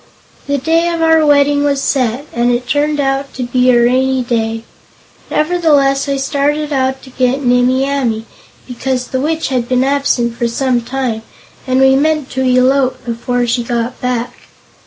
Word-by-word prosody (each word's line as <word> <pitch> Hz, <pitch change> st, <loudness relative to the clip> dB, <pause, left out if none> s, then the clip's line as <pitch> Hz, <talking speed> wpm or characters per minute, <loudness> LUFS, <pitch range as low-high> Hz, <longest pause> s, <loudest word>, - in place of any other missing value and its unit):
"The 285 Hz, 0 st, 0 dB
day 325 Hz, +5 st, +1 dB
of 335 Hz, -1 st, -1 dB
our 320 Hz, -1 st, +4 dB
wedding 290 Hz, -1 st, +3 dB
was 285 Hz, -1 st, +1 dB
set, 255 Hz, -1 st, -1 dB
and 240 Hz, +1 st, +1 dB
it 245 Hz, +1 st, -1 dB
turned 295 Hz, +1 st, 0 dB
out 275 Hz, 0 st, -1 dB
to 255 Hz, -, -3 dB
be 250 Hz, +1 st, +1 dB
a 245 Hz, -1 st, +5 dB
rainy 255 Hz, +2 st, +2 dB
day. 225 Hz, -2 st, -2 dB, 0.7 s
Nevertheless 300 Hz, -4 st, +1 dB
I 275 Hz, -, 0 dB
started 290 Hz, +2 st, -1 dB
out 265 Hz, 0 st, -1 dB
to 260 Hz, -, -13 dB
get 255 Hz, +2 st, 0 dB
Nimmie 250 Hz, +2 st, +2 dB
Amee, 240 Hz, -6 st, -1 dB, 0.4 s
because 255 Hz, 0 st, -3 dB
the 260 Hz, -, -2 dB
Witch 320 Hz, +1 st, -1 dB
had 250 Hz, -3 st, -2 dB
been 255 Hz, 0 st, +2 dB
absent 270 Hz, -4 st, 0 dB
for 235 Hz, -, -1 dB
some 245 Hz, +1 st, 0 dB
time, 245 Hz, -2 st, -3 dB, 0.5 s
and 255 Hz, 0 st, +1 dB
we 265 Hz, 0 st, +5 dB
meant 305 Hz, 0 st, 0 dB
to 260 Hz, -, -2 dB
elope 255 Hz, +1 st, +2 dB
before 245 Hz, +1 st, -2 dB
she 240 Hz, +1 st, 0 dB
got 235 Hz, +1 st, -3 dB
back. 250 Hz, -1 st, -2 dB
260 Hz, 170 wpm, -14 LUFS, 245-280 Hz, 0.7 s, a